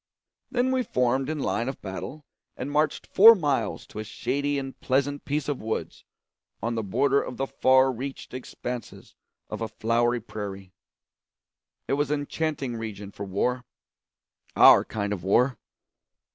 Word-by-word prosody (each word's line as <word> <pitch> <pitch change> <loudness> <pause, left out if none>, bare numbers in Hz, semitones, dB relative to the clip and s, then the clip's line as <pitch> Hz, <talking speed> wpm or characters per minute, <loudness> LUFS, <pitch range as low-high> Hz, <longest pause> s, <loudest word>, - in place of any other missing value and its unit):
Then 250 +1 +1
we 260 -1 +2
formed 130 - 0
in 155 - -2
line 125 -3 -1
of 135 - -6
battle 105 +10 -7 0.3
and 135 +3 -4
marched 150 +1 +1
four 225 +4 +8
miles 140 - -1
to 110 - -9
a - - -3
shady 140 +6 -2
and 135 -1 -6
pleasant 140 +2 0
piece 145 0 -1
of 145 -3 -2
woods 110 0 -4 0.5
on 115 +1 -2
the 115 - -1
border 135 +7 +2
of 125 - -7
the 135 - 0
far 130 0 +4
reached 130 +2 -7
expanses 125 -1 -7 0.3
of - - -6
a 115 - -1
flowery 115 +3 +1
prairie. 100 -4 -7 1.1
It - - 0
was 145 0 +1
an 150 -1 0
enchanting 145 -5 -3
region 105 -3 -6
for 100 - -7
war 125 +6 -1 0.9
our - - +8
kind 105 -1 -3
of 90 -4 -6
war. 125 +6 +2
130 Hz, 155 wpm, -26 LUFS, 110-145 Hz, 1.1 s, four